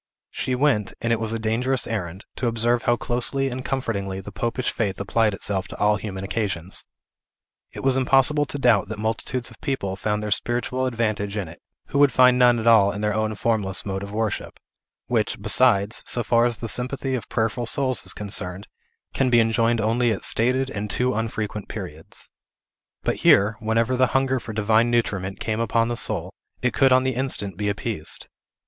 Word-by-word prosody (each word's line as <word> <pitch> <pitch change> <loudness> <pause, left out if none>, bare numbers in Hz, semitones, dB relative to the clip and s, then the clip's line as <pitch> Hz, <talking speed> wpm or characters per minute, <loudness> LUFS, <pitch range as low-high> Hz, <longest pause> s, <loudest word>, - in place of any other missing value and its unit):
She 130 - -2
went 125 -6 +1
and 115 0 0
it 115 - 0
was 110 -1 -3
a 115 - -1
dangerous 120 +4 0
errand 95 -4 -4
to 125 - -1
observe 120 +1 +2
how 120 - +2
closely 125 +3 0
and 130 0 -5
comfortingly 100 -8 -3
the 95 +1 -9
popish 120 +5 -2
faith 100 -5 -2
applied 105 +1 +1
itself 95 -2 0
to - - -8
all 105 0 +3
human 95 -2 -6
occasions. 95 -4 -3 0.9
It - - -8
was 135 -1 +3
impossible 135 +3 +4
to 145 - -3
doubt 115 -7 +3
that 110 - -5
multitudes 115 +3 -2
of - - -17
people 115 -10 -2
found 105 +1 -2
their 105 - -4
spiritual 120 +4 -1
advantage 110 -4 -2
in 100 -4 -3
it, 85 - -13 0.3
who 140 - 0
would 145 -2 +6
find 125 +1 +5
none 125 -1 +5
at 110 - -3
all 110 -4 +6
in 100 +1 -5
our 105 - +1
own 110 0 -1
formless 105 -4 -1
mode 95 -1 -3
of 100 0 -7
worship; 110 0 -3 0.5
which, 110 -4 -1
besides, 105 0 +3
so 120 - +1
far 115 +2 +3
as 120 -2 +1
the 115 - -5
sympathy 130 +3 -2
of 120 -5 -4
prayerful 115 +1 -1
souls 130 -1 0
is - - -4
concerned, 95 -2 -3 0.5
can 135 -1 +1
be 120 -1 +5
enjoyed 115 +1 +2
only 115 +2 +2
at 105 - -3
stated 130 +3 +1
and 105 -2 -4
too 125 +3 0
unfrequent 105 -2 -3
periods. 90 -7 -5 0.7
But - - 0
here, 100 +2 +4
whenever 115 +3 +1
the 130 0 +3
hunger 130 -1 +1
for 115 -1 -8
divine 110 +2 +2
nutriment 100 -5 -1
came 110 0 -2
upon 115 0 +1
the 120 - -1
soul, - - 0 0.3
it 125 -2 0
could 135 -1 +4
on 130 0 +5
the 130 0 0
instant 120 -7 -1
be 105 +2 -1
appeased. 100 -4 -2
115 Hz, 195 wpm, -23 LUFS, 105-125 Hz, 0.9 s, would